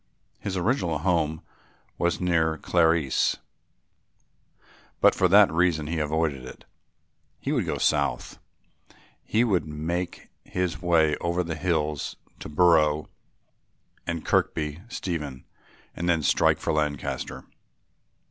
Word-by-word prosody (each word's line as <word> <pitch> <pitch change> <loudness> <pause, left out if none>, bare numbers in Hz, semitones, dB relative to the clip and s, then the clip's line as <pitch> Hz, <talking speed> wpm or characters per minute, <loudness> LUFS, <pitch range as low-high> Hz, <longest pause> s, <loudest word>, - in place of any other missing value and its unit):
His 95 -1 -4
original 90 - 0
home 80 -2 0 0.6
was 85 0 +1
near 80 -3 +1
Carlisle, 80 -5 +2 1.6
but - - +6
for 95 - +3
that 100 +2 +6
reason 80 -2 +1
he 80 +2 -2
avoided 75 -3 -1
it. 65 - -11 0.7
He - - -3
would - - 0
go - - -1
south, - - 0 0.8
he 110 +2 +1
would 95 -9 +1
make 85 +4 -4
his 90 -1 -3
way 80 -4 +3
over 85 +1 -1
the 85 -1 -4
hills 75 -3 -1 0.2
to - - -8
Brough 75 -2 +3 1.0
and 85 -2 -3
Kirkby 75 +1 0
Stephen 75 - -5 0.5
and 85 +1 -2
then 85 -3 +2
strike - - +3
for - - -2
Lancaster. 75 -2 -3
80 Hz, 115 wpm, -26 LUFS, 75-90 Hz, 1.6 s, but